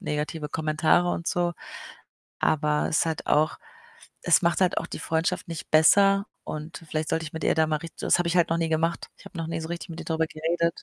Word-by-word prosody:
negative 150 +1 -3
Kommentare 160 +3 +2
und 170 - -4
so. 175 -1 0 0.9
Aber 150 -1 +1
es 160 - +2
hat 160 -1 -3
auch 155 +1 +2 0.7
es 175 - +6
macht 170 +2 +1
halt 185 - +2
auch - - -5
die - - -7
Freundschaft 170 +2 -1
nicht 165 -4 -7
besser 195 +6 +5 0.2
und 155 +3 -7
vielleicht 155 0 -2
sollte 160 0 0
ich 155 - -9
mit 160 - -4
ihr - - +3
da 160 0 +3
mal 155 -1 0
richt 165 0 -10
das - - +3
habe 175 -1 0
ich 175 - 0
halt 175 - +4
noch 165 - +2
nie 165 - 0
gemacht. 165 +2 0
Ich - - -17
habe - - -11
noch 165 - -3
nie 165 0 -3
so 160 - -6
richtig 170 +1 -6
mit 165 - -7
ihr - - -9
drüber 160 0 0
geredet. 170 +2 -1
165 Hz, 235 wpm, -26 LUFS, 155-170 Hz, 0.9 s, es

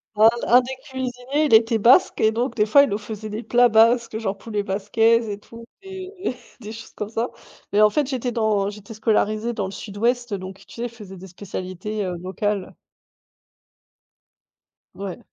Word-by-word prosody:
un 220 +1 +7 0.2
un 250 +2 +7
des 260 +1 -6
cuisiniers, 260 +2 -2
il 275 - +1
était 225 +1 +5
basque 250 - +4
et 220 - +4
donc 240 +4 -2
des 210 -2 +3
fois, 280 +6 +6
il - - 0
nous 200 - -1
faisait 215 0 -7
des 215 +3 -5
plats 245 0 +4
basques, 230 0 +3
genre 200 -3 -3
poulet 210 -1 -3
basquaise 225 +4 +2
et 205 -1 -4
tout, 230 +2 -13 0.2
et 380 -4 -6 0.3
des 215 0 -7
choses 225 - -10
comme 210 0 -5
ça, 230 +2 -2 0.4
mais 210 - +4
en 215 - +7
fait, 285 +5 0
j'étais 255 -2 -2
dans 215 -3 +1
j'étais 210 +1 -10
scolarisée 215 +1 0
dans 205 -3 -2
le 190 - -5
sud-ouest 230 +3 -2
donc 190 0 -7
tu - - -14
sais, 235 - -5
ils - - -4
faisaient 210 -5 -11
des 190 +2 -10
spécialités, 190 +2 -5
heu, 180 -1 -3
locales. 195 +1 -3 2.2
Ouais. 195 -2 -6
220 Hz, 185 wpm, -22 LUFS, 205-240 Hz, 2.2 s, un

